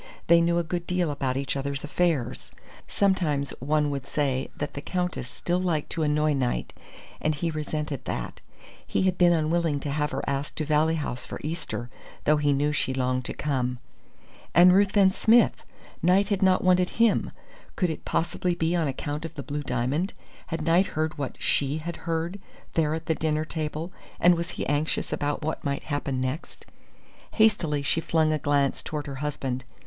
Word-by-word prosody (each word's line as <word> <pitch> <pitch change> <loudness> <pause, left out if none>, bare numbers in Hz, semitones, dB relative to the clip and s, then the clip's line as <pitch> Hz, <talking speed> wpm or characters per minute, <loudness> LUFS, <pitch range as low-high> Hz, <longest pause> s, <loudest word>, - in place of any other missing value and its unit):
They 170 0 +6
knew 170 0 +2
a 170 - +2
good 175 +1 -4
deal 180 -3 +1
about 135 -2 -1
each 140 0 -2
other's 140 0 -3
affairs. 150 -6 -1 0.4
Sometimes 170 -8 +1
one 150 +2 +1
would 140 -1 -4
say 135 -3 -1
that 145 - -3
the 140 - -5
Countess 180 -7 -2
still 175 +1 -1
liked 170 -5 -1
to 165 - -2
annoy 150 0 +2
Knight, 130 -3 -1 0.5
and 155 0 +1
he 165 +3 -1
resented 150 -2 -3
that. - - -4 0.5
He - - +1
had 185 -1 +2
been 175 -1 +5
unwilling 160 -2 +1
to 145 - -3
have 150 +1 0
her - - -3
asked 140 +1 -2
to 155 - -2
Valley 155 +2 +3
House 135 -5 -3
for - - -6
Easter, 155 -6 -4 0.4
though 150 +1 +4
he 145 -1 +2
knew 145 +2 +2
she 130 -2 -1
longed 130 -1 0
to - - -4
come. 125 -4 -1 0.8
And 180 +1 +8
Ruthven 195 0 +5
Smith! 225 +5 +4 0.4
Knight 190 +3 +4
had 200 -1 0
not 190 -1 +4
wanted 180 -1 +4
him. 230 -2 +4 0.5
Could 180 -3 +1
it 155 - -7
possibly 175 +1 0
be 165 +1 0
on 165 -3 +1
account 145 +3 -3
of 165 0 -7
the 140 - -5
blue 145 0 -3
diamond? 135 +7 -1 0.3
Had 165 -2 -3
Knight 170 +4 +4
heard 155 -1 -1
what 140 -3 -4
she 140 +1 +1
had 170 +2 -5
heard 165 +4 -1 0.3
there 155 -1 +2
at 160 0 -6
the 160 - +2
dinner 155 0 0
table, 155 +2 -4 0.3
and 175 +1 +6
was 170 0 -2
he - - -2
anxious 145 +2 -1
about 145 +1 -1
what 155 - -3
might 140 -1 -2
happen 145 -3 -2
next? 130 +5 -4 0.7
Hastily 180 -10 +3
she 160 - +1
flung 160 -1 +2
a 155 - 0
glance 145 -1 +1
toward 150 -2 -4
her 140 -2 -6
husband. 135 -3 -3
155 Hz, 185 wpm, -26 LUFS, 140-170 Hz, 0.8 s, And